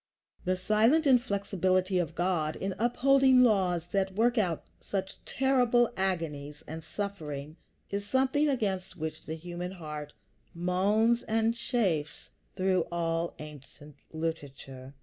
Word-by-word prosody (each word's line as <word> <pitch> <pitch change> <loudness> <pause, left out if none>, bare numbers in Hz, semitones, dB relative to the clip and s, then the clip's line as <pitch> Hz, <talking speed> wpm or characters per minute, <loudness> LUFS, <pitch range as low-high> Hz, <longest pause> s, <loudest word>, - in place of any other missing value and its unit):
The 185 0 +1
silent 220 +11 +3
inflexibility 195 - +2
of 165 -2 -2
God 170 -3 0
in 195 0 -3
upholding 260 +2 +4
laws 185 -7 +2
that 190 -1 0
work 235 +3 +3
out 175 -6 0 0.2
such 190 -1 -5
terrible 245 -3 +2
agonies 155 -6 -2
and 160 +1 -7
suffering 155 -7 -5 0.4
is 200 0 -2
something 265 +7 +2
against 190 -8 -2
which 160 -1 -6
the 160 - -3
human 175 +2 -6
heart 150 -4 -7 0.4
moans 205 +7 +2
and 225 +1 +2
chafes 195 - -1 0.2
through 185 -2 +1
all 165 0 -1
ancient 150 -1 -12
literature. 140 -4 -6
185 Hz, 120 wpm, -29 LUFS, 160-225 Hz, 0.4 s, upholding